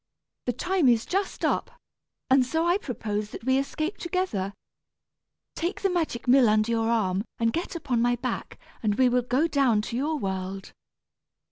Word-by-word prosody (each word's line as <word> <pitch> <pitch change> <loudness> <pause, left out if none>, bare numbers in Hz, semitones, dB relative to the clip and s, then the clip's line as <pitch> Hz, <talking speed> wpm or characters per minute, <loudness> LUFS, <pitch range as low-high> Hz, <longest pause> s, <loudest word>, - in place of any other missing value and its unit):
The 245 - +1
time 350 - +1
is 230 -2 +3
just 390 +1 -1
up, - - -1 0.5
and 260 0 +5
so 320 +6 0
I 350 +3 +3
propose 210 - -3
that - - -9
we 260 +2 +3
escape 310 +6 -3
together. 345 - -1 1.0
Take 345 +4 -3
the 390 - +2
magic 320 -9 -2
mill 250 -2 +6
under 215 +2 +2
your 225 -1 +1
arm 200 -4 +1
and 230 0 +1
get 345 +1 -3
upon 250 -8 -1
my 245 +1 +3
back, 245 +1 -4 0.2
and 210 -2 +1
we 255 +2 +4
will 250 0 +2
go 255 +6 +1
down 260 -9 +2
to 230 - -5
your 300 +5 0
world." 190 -3 -4
250 Hz, 170 wpm, -26 LUFS, 220-320 Hz, 1.0 s, mill